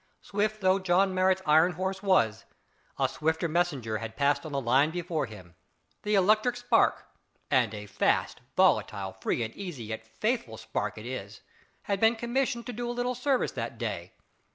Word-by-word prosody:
Swift 210 +1 -2
though 190 0 +3
John 185 +1 +2
Marrot's 185 0 +2
iron 160 +4 +5
horse 190 +3 -3
was, 115 - +2 0.5
a - - +2
swifter 160 +2 -1
messenger 145 -10 0
had 115 -1 -6
passed 145 +3 +1
on - - -8
the 140 - 0
line 135 +4 +3
before 170 -3 -2
him. 95 -6 -12 0.5
The 210 0 0
electric 215 +5 +3
spark 245 0 +2 0.5
and 120 -5 +3
a 105 0 -7
fast 100 - 0 0.2
volatile, 95 -1 +2
free 120 - 0
and 110 - -6
easy, 175 -11 -6
yet 110 0 -6
faithful 215 - -1
spark 110 -2 -3
it 110 - -8
is 110 -5 -6 0.4
had 200 -1 -1
been 225 +2 +4
commissioned 240 +1 -1
to 245 - -5
do 240 +1 -4
a 240 - -4
little 245 +1 0
service 255 +1 0
that - - -5
day. - - -4
175 Hz, 175 wpm, -28 LUFS, -, 0.5 s, iron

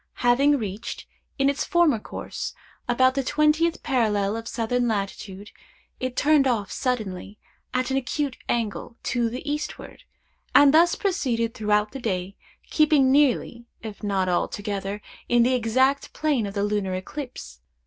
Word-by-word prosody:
Having 275 +4 +4
reached, 210 -2 -5 0.3
in 275 - +2
its 280 0 0
former 340 -9 +3
course, - - -6 0.3
about 255 +2 +4
the 275 0 -1
twentieth 305 +4 +2
parallel 215 -6 +1
of 225 0 -6
southern 240 +1 -1
latitude, 200 -1 -4 0.5
it 255 -1 -3
turned 290 -1 +4
off 220 -6 -1
suddenly, 210 -6 -3 0.3
at 255 +1 -1
an 265 - +1
acute 275 +1 -2
angle, 230 0 -2
to 240 -2 0
the 250 +5 -7
eastward, 300 +1 -5 0.5
and 285 0 +7
thus 340 +2 +5
proceeded 240 - -1
throughout 210 0 +1
the 270 - -7
day, 190 -4 -3 0.4
keeping 300 -4 +4
nearly, 250 -4 +2 0.2
if 215 -3 -8
not 195 -2 0
altogether, 200 +2 -2 0.3
in 240 -1 +5
the 255 +2 +2
exact 260 +4 +1
plane 285 -9 0
of 200 - -8
the 200 - 0
lunar 205 -3 -1
ellipse. 215 - -8
240 Hz, 145 wpm, -24 LUFS, 210-275 Hz, 0.5 s, and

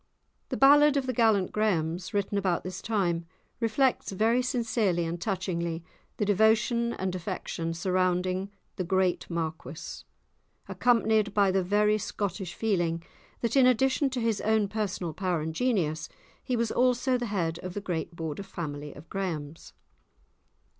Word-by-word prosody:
The - - -2
ballad 290 +1 +6
of 270 - 0
the 255 - -1
"Gallant 220 -5 +3
Grahams," 180 -5 0
written 205 -1 -1
about 185 -4 0
this 185 0 -6
time, 175 -7 0 0.3
reflects 240 +2 +1
very 225 +5 +2
sincerely 225 -8 0
and 170 +1 -4
touchingly 170 -4 -2 0.3
the 210 - 0
devotion 220 +3 +3
and 190 -1 -3
affection 165 -1 -4
surrounding 185 +1 0 0.3
the 185 - -1
great 185 0 0
Marquis, 165 -1 -5 0.7
accompanied 220 -4 +2
by 200 -2 +4
the 190 0 +2
very 210 +3 +2
Scottish 190 -3 -4
feeling 175 -6 0 0.4
that 235 +1 0
in 265 -2 +6
addition 265 +3 +3
to 260 -1 -3
his 225 -3 0
own 220 -1 +2
personal 195 -5 -3
power 180 0 -1
and 160 +1 -3
genius, 160 -9 0 0.3
he 255 - -1
was 230 -1 0
also 250 +1 +2
the 245 -1 -1
head 170 -6 -1
of 180 -1 -7
the - - -1
great 170 -3 -4
Border 160 +1 -4
family 150 -7 -6
of 145 +3 -12
Grahams. 165 -6 -5
195 Hz, 145 wpm, -28 LUFS, 170-225 Hz, 0.7 s, ballad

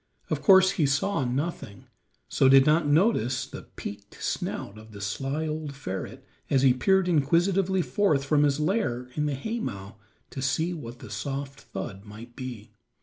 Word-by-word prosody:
Of - - 0
course 190 -1 +7
he 160 -7 +1
saw 140 +4 +1
nothing, 125 - -4 0.4
so 130 - +3
did 135 0 +7
not 155 +1 +3
notice 145 - +2
the - - -10
peaked 100 0 -8
snout 100 +2 -4
of 110 0 -14
the 100 - -9
sly 135 +9 -2
old 155 -2 -4
ferret 95 -9 -6 0.2
as 135 -2 +3
he 130 -2 +6
peered 190 +9 +2
inquisitively 175 +4 +2
forth 165 -10 +1
from 145 +1 +3
his 145 -1 +2
lair 145 - -1
in 150 +2 -1
the 145 - -1
haymow 125 - -5 0.3
to 135 - -5
see 160 +6 0
what 120 -7 -8
the - - -11
soft 140 -1 -5
thud 100 -3 -7
might 110 +3 -12
be. 125 -5 -7
140 Hz, 165 wpm, -27 LUFS, 120-165 Hz, 0.4 s, course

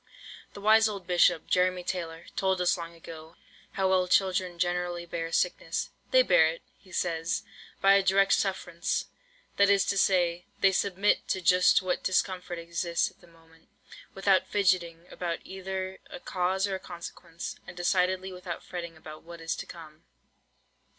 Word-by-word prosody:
The 200 - -10
wise 220 +2 +5
old 200 -3 -6
Bishop, 175 -2 +3
Jeremy 180 0 +1
Taylor, 165 -3 -4
told 190 -1 +1
us 180 -1 +3
long 170 -1 -8
ago, 160 0 -11 0.4
how 190 -1 +1
well 185 -1 +3
children 185 -1 +1
generally 175 0 -1
bear 165 -1 -4
sickness. 170 -2 -1 0.2
"They 255 0 +6
bear 175 -8 +5
it," 165 +1 -5 0.2
he 190 - -20
says, 165 -2 -1 0.4
"by 195 0 +6
a 200 - +5
direct 195 +1 +3
sufferance;" 190 -2 -1 0.5
that 200 0 +5
is 200 -1 +4
to 200 - 0
say, 180 -2 +2
they 195 - +5
submit 195 +1 +1
to 190 - 0
just 180 +1 +4
what 185 -1 -1
discomfort 185 -1 -1
exists 170 0 -1
at - - -29
the 175 - -18
moment, 165 -1 -23 0.5
without 195 -1 +3
fidgetting 180 -4 +1
about 170 -2 -3
either 190 0 -5
"a 270 - -8
cause 190 -3 0
or 195 - -3
a 190 - -2
consequence," 170 -1 -8
and 175 - -10
decidedly 185 +1 +1
without 180 -2 -7
fretting 170 -2 -7
about 155 -1 -11
what 170 0 -11
is 165 0 -2
to - - -7
come. 155 -2 -12
180 Hz, 165 wpm, -28 LUFS, 170-190 Hz, 0.5 s, They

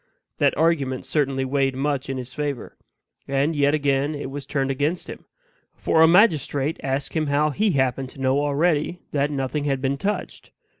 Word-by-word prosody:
That - - +2
argument 145 -6 +1
certainly 135 -3 0
weighed 135 0 0
much 140 0 -2
in 135 - -2
his 125 0 -7
favor. 145 -4 -4 0.5
And 140 +4 0
yet 145 0 +3
again 140 0 0
it 145 -2 -5
was 140 -1 -7
turned 135 -2 -1
against 145 +6 -1
him; - - -9 0.5
for 160 - +2
a 160 - +8
magistrate 160 -6 +3
asked 135 +1 -2
him 155 -2 0
how 145 +2 +2
HE 205 +4 +1
happened 130 -1 0
to - - -14
know 135 +1 +2
already 150 +3 0
that 145 0 +1
nothing 145 +1 -2
had 135 -2 0
been 135 +1 -1
touched. 200 +6 -4
140 Hz, 180 wpm, -23 LUFS, 135-150 Hz, 0.5 s, a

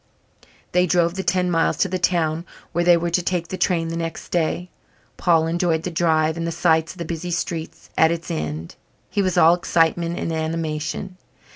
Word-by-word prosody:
They 180 0 +3
drove 170 -1 +2
the 190 - -3
ten 180 0 +1
miles 165 -1 +2
to - - +2
the 185 0 -2
town 165 -3 +1 0.3
where 175 +1 0
they 175 0 +6
were 170 0 -2
to 180 - +2
take 175 -1 -2
the - - -3
train 170 -3 0
the 165 - -3
next 165 -1 -5
day. 175 +1 -1 0.4
Paul 165 -3 +3
enjoyed 165 -1 0
the 180 - -3
drive 160 -1 +2
and 165 0 -2
the - - -1
sights 160 -1 +2
of - - -19
the 170 - -4
busy 170 +2 -4
streets 165 -1 -4
at 160 - +5
its 170 0 -3
end. 75 +1 -4 0.4
He 205 - +1
was 185 -3 0
all 165 +1 +7
excitement 170 0 +1
and 165 - -2
animation. 160 +3 -3
170 Hz, 195 wpm, -22 LUFS, 160-175 Hz, 0.4 s, all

